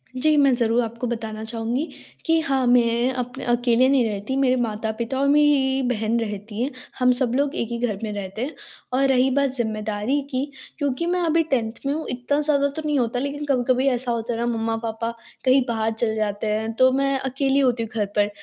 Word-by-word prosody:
जी, 305 +4 +3
मैं 275 -2 +5
ज़रूर 235 0 +2
आपको 235 +2 -4
बताना 220 -2 -4
चाहूँगी 230 +6 -2 0.4
कि 325 -1 +3
हाँ, 270 -5 0
मैं 240 0 +3
अपन 250 +1 -5
अकेले 245 +1 +3
नहीं 270 -3 +3
रहती, 205 +5 -3
मेरे 260 -2 +3
माता-पिता 225 +3 -2
और 280 - +2
मेरी 280 -2 +4
बहन 225 -1 0
रहती 210 0 -4
है। 265 +4 -1 0.3
हम 250 0 +5
सब 250 -3 +1
लोग 280 +1 0
एक 230 - -1
ही 235 - -3
घर 205 -3 -4
में 215 - -2
रहते 200 +1 -5
हैं 300 - -7 0.4
और 275 +1 +3
रही 260 0 +3
बात 280 +1 +2
ज़िम्मेदारी 215 +2 -1
की, 260 +2 0 0.3
क्योंकि 285 +1 -1
मैं 355 +1 0
अभी 330 0 +3
10th 230 -3 0
में 275 - +1
हूँ, 315 - -3
इतना 250 +4 -1
ज़्यादा 285 -2 +2
तो 315 - -3
नहीं 300 -1 +1
होता। 245 0 0
लेकिन 280 +2 -3
कभी-कभी 255 -1 +1
ऐसा 245 -1 -1
होता 235 0 -2
है 230 - -4
ना, 235 - 0
मम्मा-पापा 225 0 -2 0.3
कहीं 260 +1 +5
बाहर 225 -1 0
चले 220 -2 0
जाते 210 0 -2
हैं, 220 +1 -1
तो 255 +3 +4
मैं 275 +1 +1
अकेली 270 +1 0
होती 250 -4 +2
हूँ 225 - -6
घर 210 -2 +1
पर। 205 0 +3
245 Hz, 210 wpm, -23 LUFS, 225-275 Hz, 0.4 s, मैं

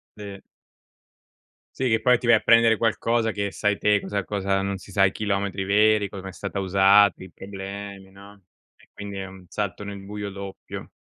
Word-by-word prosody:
Sì. 100 -2 -9 1.4
Sì, 130 - 0
che 110 -1 +1
poi 125 +1 +4
ti 120 - -8
vai 120 -1 +6
a - - +3
prendere 115 0 +5
qualcosa 115 0 +1
che 100 -1 -3
sai 105 +1 0
te 105 -1 +2
cosa 100 -2 -3
cosa 95 -1 -1
non 100 0 -2
si 95 - -14
sa 95 +1 +4
i 95 - +2
chilometri 100 -2 -2
veri, 105 +1 +3
come 95 -1 -8
è - - -8
stata 100 +1 -5
usata, 95 +1 +4
i 95 - -11
problemi, 100 0 -8
no. 100 +1 -15 0.3
E - - -24
quindi 100 -1 -8
è 95 - -4
un 95 -1 -13
salto 105 -1 -4
nel 100 -1 -7
buio 105 0 -6
doppio. 100 0 -8
100 Hz, 190 wpm, -24 LUFS, 95-105 Hz, 1.4 s, vai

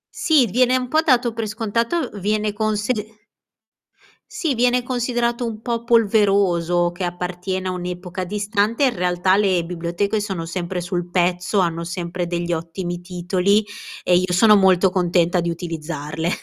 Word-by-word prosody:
sì, 305 -6 +3
viene 250 +4 +2
un 250 -1 -4
po' 310 +2 +3
dato 250 -6 +2
per 225 -1 -3
scontato, 230 +8 -1
viene 210 +1 0
consid 215 +1 -1 1.3
sì 310 -6 -1
viene 245 +1 +2
considerato 240 -1 -1
un 220 -2 -5
po' 235 -1 -3
polveroso, 195 -6 +2
che 175 +2 -6
appartiene 180 +1 -3
a 185 - -1
un'epoca 180 +1 -5
distante, 210 +6 0
in 250 -3 +1
realtà 180 +1 +2
le 190 -4 +2
biblioteche 175 +5 -2
sono 190 -5 -4
sempre 175 +1 -4
sul 175 0 -3
pezzo, 180 +2 +1
hanno 170 -2 0
sempre 175 +1 -4
degli 175 0 -2
ottimi 175 +2 -4
titoli 185 +3 +1 0.4
e 180 - +3
i 180 - +1
sono 210 +4 +6
molto 190 -1 +4
contenta 180 -1 +1
di 170 0 -1
utilizzarle. 165 -1 -4
190 Hz, 145 wpm, -21 LUFS, 175-220 Hz, 1.3 s, sono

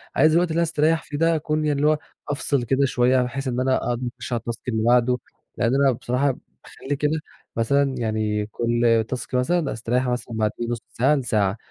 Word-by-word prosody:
عايز 155 0 +5
الوقت 175 +2 +3
اللي 160 - -3
أنا 170 - +3
هاستريّح 160 0 +1
فيه 145 - -6
ده 165 +2 +3
أكون 155 0 -1
يعني 145 -2 +1
اللي 150 - +3
هو 155 - +2 0.3
أفْصل 140 -2 0
كده 135 +4 +2
شوية، 125 0 +3
بحيث 135 +2 -3
إن 125 0 -1
أنا 130 0 +2
أقدر 120 +1 -2
أخُش 125 - -5
على 115 - -1
الtask 115 -1 -4
اللي 110 -3 0
بعده. 125 +1 +3 0.4
لأن 120 +3 +1
أنا 140 -1 +4
بصراحة 125 +3 0 0.3
باخلّي 145 - -5
كده 150 +2 0 0.4
مثلًا 135 +4 +1
يعني 110 -2 -1
كل 115 0 +1
task، 120 -3 -4
مثلًا 140 +5 +1
أستريّح 125 +3 -1
مثلًا 125 -1 -3
بعديه 110 +2 -1
بنُص 120 -1 -3
ساعة 135 +5 +2
لساعة. 110 -6 0
125 Hz, 200 wpm, -23 LUFS, 115-145 Hz, 0.4 s, عايز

